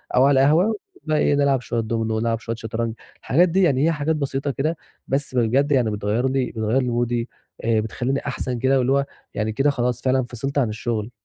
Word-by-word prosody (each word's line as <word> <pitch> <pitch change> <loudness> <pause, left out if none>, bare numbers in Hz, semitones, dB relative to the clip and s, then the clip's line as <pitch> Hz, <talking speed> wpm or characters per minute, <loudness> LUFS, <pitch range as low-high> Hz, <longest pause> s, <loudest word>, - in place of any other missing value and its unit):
أو 130 - +6
على 135 -1 +4
القهوة، 170 +10 +4 0.3
وبقى 155 -1 0
إيه، 145 - +3
نلعب 140 -3 +2
شوية 120 -1 -2
دومينو، 110 0 -1
ونلعَب 115 0 0
شوية 115 0 -4
شطرنج. 115 0 -3 0.3
الحاجات 170 +8 +3
دي 190 +3 +2
يعني 140 -3 +3
هي - - +3
حاجات 155 +1 0
بسيطة 140 -1 -2
كده، 155 +5 -1 0.3
بس 135 -1 -1
بجد 125 +5 +2
يعني 125 -6 +3
بتغيِّر 105 +5 0
لي 130 -2 -1
بتغيِّر 110 +4 0
لي 125 - -1
مودي، 120 0 -1 0.4
بتخلِّيني 115 +4 0
أحسن 125 -2 -3
كده، 130 +2 +3
واللي 130 0 +1
هو 140 0 +2 0.3
يعني 110 0 -1
كده 135 +6 +2
خلاص 125 -3 -1
فعلًا 130 0 +2
فصلت 125 +4 -4
عن 130 -6 +2
الشغل. 110 +1 -3
130 Hz, 205 wpm, -22 LUFS, 115-140 Hz, 0.4 s, أو